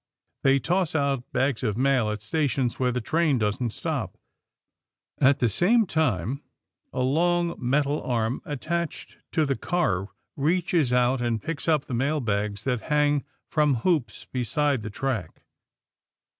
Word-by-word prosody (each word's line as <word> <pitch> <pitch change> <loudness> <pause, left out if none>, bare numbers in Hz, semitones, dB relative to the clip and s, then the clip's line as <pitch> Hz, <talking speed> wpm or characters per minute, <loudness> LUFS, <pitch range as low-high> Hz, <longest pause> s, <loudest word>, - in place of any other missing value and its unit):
They 135 0 +4
toss 175 +5 0
out 140 -4 0
bags 130 -1 0
of 110 -4 -1
mail 130 -4 +2
at 105 0 -4
stations 140 -6 0
where 125 -1 +2
the 125 +1 -2
train 155 +3 +2
doesn't 115 +3 0
stop. - - -4 1.0
At 135 +1 +5
the 125 - +2
same 210 - +3
time, 135 - 0 0.5
a 130 - -2
long 170 +5 +2
metal 140 +4 +1
arm 115 0 -1
attached 165 +4 -4 0.2
to 155 - +3
the 135 -1 0
car 100 - 0 0.3
reaches 160 -2 +1
out 125 +1 +2
and 120 -2 0
picks 165 +3 -5
up 155 -4 +2
mailbags 115 -7 -1
that 125 -4 -1
hang 145 -1 +2 0.2
from 150 -3 +2
hoops 140 - 0
beside 135 +1 0
the 105 - -5
track. 110 -6 -3
135 Hz, 140 wpm, -26 LUFS, 120-155 Hz, 1.0 s, At